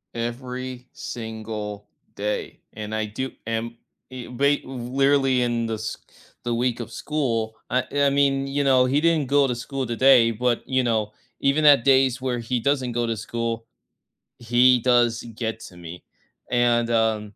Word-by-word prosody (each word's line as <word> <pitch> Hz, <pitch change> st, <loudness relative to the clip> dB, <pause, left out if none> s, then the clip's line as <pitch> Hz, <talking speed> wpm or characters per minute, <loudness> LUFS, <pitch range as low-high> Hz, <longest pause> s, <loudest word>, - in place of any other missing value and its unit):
Every 125 Hz, +1 st, -5 dB
single 110 Hz, -3 st, -6 dB, 0.3 s
day, 105 Hz, +1 st, -4 dB
and 110 Hz, 0 st, -5 dB
I 110 Hz, 0 st, -1 dB
do 130 Hz, +5 st, -4 dB, 0.2 s
am 115 Hz, +1 st, -3 dB, 0.3 s
e 130 Hz, -2 st, -8 dB
be 140 Hz, +4 st, +1 dB
literally 135 Hz, +1 st, +1 dB
in 120 Hz, -1 st, -1 dB
the 110 Hz, -, -2 dB
s 110 Hz, +1 st, -5 dB, 0.5 s
the 120 Hz, -, -1 dB
week 120 Hz, 0 st, 0 dB
of 120 Hz, -, -6 dB
school, 115 Hz, -8 st, -2 dB, 0.2 s
uh, 125 Hz, 0 st, +1 dB
I 140 Hz, -1 st, +4 dB
mean, 140 Hz, -1 st, +2 dB
you 140 Hz, +1 st, 0 dB
know, 130 Hz, -2 st, +4 dB
he 140 Hz, +3 st, +1 dB
didn't 165 Hz, -4 st, +2 dB
go 140 Hz, +1 st, +4 dB
to 125 Hz, -, 0 dB
school 130 Hz, +2 st, -4 dB
today, 120 Hz, 0 st, +5 dB
but, 120 Hz, +1 st, -1 dB
you 130 Hz, -1 st, +2 dB
know, 110 Hz, -3 st, 0 dB, 0.3 s
even 140 Hz, +3 st, +2 dB
at 145 Hz, -5 st, +7 dB
days 130 Hz, -2 st, +4 dB
where 125 Hz, -2 st, -1 dB
he 120 Hz, +2 st, -2 dB
doesn't 130 Hz, -3 st, 0 dB
go 120 Hz, 0 st, 0 dB
to 115 Hz, -, -1 dB
school, 115 Hz, +1 st, -3 dB, 0.7 s
he 120 Hz, +1 st, +4 dB
does 120 Hz, -1 st, +2 dB
get 110 Hz, -1 st, -3 dB
to 90 Hz, -, -11 dB
me. 85 Hz, +1 st, -10 dB, 0.5 s
And, 120 Hz, -1 st, +2 dB
uh, 110 Hz, -2 st, +2 dB
120 Hz, 165 wpm, -24 LUFS, 115-130 Hz, 0.7 s, at